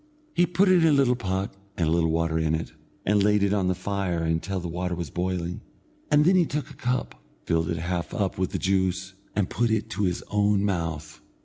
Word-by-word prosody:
He 175 - +3
put 185 +3 +3
it 185 -2 +5
in - - +6
a - - +5
little 135 -3 +4
pot 95 -2 -3 0.2
and 85 - +1
a - - +1
little 85 -1 +2
water 80 0 +1
in 80 0 +1
it, 80 - -5 0.3
and 105 +1 +3
laid 105 0 +3
it 100 0 +2
on 100 -3 +1
the 90 - +1
fire 95 -3 -2
until 80 +4 -1
the 85 - -5
water 90 +1 -2
was 85 -4 -5
boiling, 90 -1 -2 0.5
and 150 0 +5
then 185 +3 +5
he 175 -3 +4
took 150 0 -3
a - - -12
cup, 120 - -2 0.2
filled 80 +1 +1
it 85 - -1
half 85 +1 -3
up 100 -3 -1
with 95 - +1
the - - -2
juice, 95 0 0 0.2
and 105 -3 +1
put 120 +4 +1
it 110 0 -1
to 105 -1 0
his 90 -1 -1
own 105 -1 +2
mouth. 80 -5 -3
95 Hz, 230 wpm, -26 LUFS, 85-105 Hz, 0.5 s, in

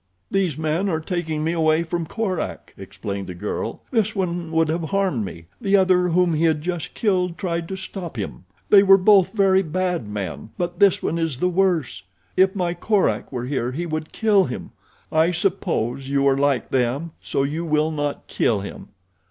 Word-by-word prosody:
"These 185 -7 0
men 160 +5 0
are 160 -3 0
taking 160 -2 -3
me 160 - +1
away 160 -1 +2
from 170 0 -3
Korak," 195 -2 -3
explained 100 -2 -6
the 90 - -6
girl. 105 +4 -4
"This 225 -3 +1
one 175 -3 -2
would 165 0 +2
have 165 +1 -1
harmed 190 - 0
me. 85 -4 -8 0.2
The 200 0 +3
other, 185 -1 +3
whom 175 0 +2
he 160 +2 +2
had 155 -2 +1
just 175 -2 -4
killed, 180 -5 0
tried 170 -2 -2
to 190 - -4
stop 185 - -7
him. 100 -2 -5 0.3
They 200 - +9
were 195 -1 +7
both 195 -1 +5
very 195 -3 +4
bad 180 - -2
men; 100 -5 -5
but 175 0 -3
this 200 -3 +4
one 165 - -1
is 165 -6 -1
the 180 +6 +1
worse. 180 -6 +1 0.3
If 190 +1 +4
my 175 -3 0
Korak 200 +3 0
were 125 -2 -3
here 125 -2 -2
he 170 +5 -3
would 155 -1 -4
kill 210 -3 +3
him. 125 - -6 0.4
I 160 +2 +3
suppose 165 - -1
you 140 0 +2
are 135 - +4
like 140 -2 +1
them, 135 +6 0
so 135 - -1
you 155 +4 -2
will 155 -1 +1
not 145 -2 -3
kill 105 -4 0
him." 100 - -8
165 Hz, 190 wpm, -22 LUFS, 145-185 Hz, 0.4 s, They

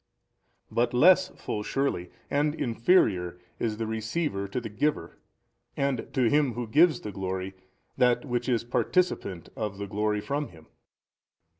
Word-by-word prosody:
but 120 +1 +1
less 185 +8 +6
full 105 - -3
surely 105 -7 -1 0.2
and 150 +1 +1
inferior 115 - +2 0.2
is 110 -2 -1
the 115 - -2
receiver 110 0 -2
to 100 - -3
the 120 - -6
giver 145 +8 -2 0.6
and 140 -4 -1
to 130 - +1
him 140 +2 +3
who 120 +1 -3
gives 150 +5 +4
the 105 - -5
glory 95 0 -4 0.4
that 125 +1 +3
which 120 -1 -2
is 120 -3 +1
participant 120 - 0
of 105 -3 -4
the 100 - -4
glory 105 +1 -1
from 140 +6 -2
him. 80 -2 -16
120 Hz, 145 wpm, -27 LUFS, 105-140 Hz, 0.6 s, less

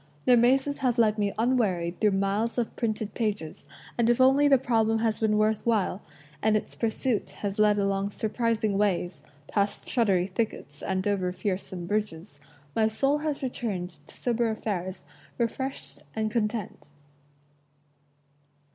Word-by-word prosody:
Their 250 - +6
mazes 265 +4 +3
have 255 -3 +1
led 215 -2 +3
me 205 -1 +1
unwearied 205 -8 +1
through 210 -2 +4
miles 200 +5 0
of 240 -2 -1
printed 215 -2 -2
pages, 205 -9 -3 0.3
and 235 0 +3
if 240 - +3
only 270 +3 +5
the 275 -1 +6
problem 225 -3 +2
has 220 -1 0
been 215 -1 +2
worth 215 0 +2
while, 215 -4 +1 0.4
and 215 0 +3
its - - -6
pursuit 230 0 -1 0.2
has 200 +1 -3
led 210 -1 +5
along 200 0 0
surprising 220 -1 0
ways, 185 -3 0 0.3
past 200 -1 -1
shuddery 195 -7 +2
thickets 185 -7 -4
and 190 0 -1
over 190 -3 0
fearsome 185 -2 -4
bridges, 190 -5 -3 0.4
my 220 -1 +3
soul 275 +7 +1
has 300 -2 -3
returned 205 -8 -3
to - - -15
sober 235 -1 0
affairs 190 -4 -3 0.3
refreshed 235 - -3
and 215 0 -1
content. 215 -8 -2
215 Hz, 145 wpm, -27 LUFS, 195-235 Hz, 0.4 s, Their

